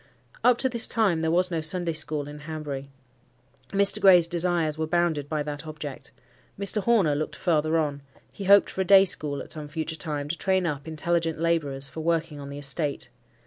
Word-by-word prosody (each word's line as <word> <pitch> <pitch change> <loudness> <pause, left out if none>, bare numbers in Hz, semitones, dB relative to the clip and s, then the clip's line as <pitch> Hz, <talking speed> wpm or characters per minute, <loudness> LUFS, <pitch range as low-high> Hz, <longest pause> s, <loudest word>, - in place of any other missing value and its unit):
Up 250 -1 +5
to 260 - +1
this 235 -3 +1
time 200 -8 +1
there 160 - 0
was 180 +2 +2
no 165 -2 -1
Sunday 170 +1 -1
school 150 -2 -2
in 150 0 -9
Hanbury. 150 -3 -6 0.8
Mr. 200 0 +2
Gray's 180 -3 +7
desires 170 -2 +1
were 160 0 -3
bounded 160 -4 0
by 155 -2 -1
that 150 +1 -6
object. 150 -3 -8 0.5
Mr. 200 +1 +1
Horner 200 -8 +3
looked 150 +2 -3
farther 160 -2 +1
on: 145 -3 -1 0.3
he 200 - -8
hoped 200 +1 +5
for 190 - -3
a - - +2
day 195 +1 +7
school 145 -6 -2
at - - -11
some 150 -2 -3
future 160 +1 -4
time, 150 -2 -4
to 170 - -1
train 190 0 0
up 145 -2 -3
intelligent 165 0 -1
labourers 150 -5 -1
for 160 - -7
working 165 -2 -1
on 140 0 -8
the 140 - -7
estate. 145 +1 -2
160 Hz, 195 wpm, -26 LUFS, 150-175 Hz, 0.8 s, Gray's